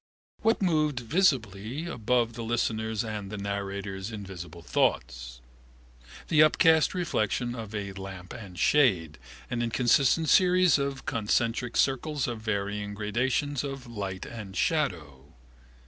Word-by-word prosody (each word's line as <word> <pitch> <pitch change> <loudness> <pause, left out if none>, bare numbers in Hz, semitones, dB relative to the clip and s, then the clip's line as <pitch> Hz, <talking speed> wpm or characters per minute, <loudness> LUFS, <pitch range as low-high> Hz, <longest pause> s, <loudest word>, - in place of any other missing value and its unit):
What 225 -2 +2
moved 155 -6 +2
visibly 120 - 0
above 120 -5 0
the 115 - -6
listener's 110 -1 -1
and 105 -2 -5
the 105 - -5
narrator's 100 0 -4
invisible 90 -5 -8
thoughts? 60 -6 -1 0.9
The 155 -2 +4
upcast 160 +2 +5
reflection 120 - -1
of 110 -3 -7
a 100 -1 -3
lamp 95 -1 -8
and 95 -6 -10
shade, 90 - +3 0.3
an 120 -1 -1
inconstant 125 +6 +3
series 180 0 +5
of 140 -1 -3
concentric 115 +2 0
circles 140 +1 +1
of 120 -2 -4
varying 105 -1 -2
gradations 125 +7 -1
of 135 -2 -5
light 100 -5 -5
and 105 -5 -8
shadow. 75 - -1
115 Hz, 120 wpm, -28 LUFS, 100-135 Hz, 0.9 s, upcast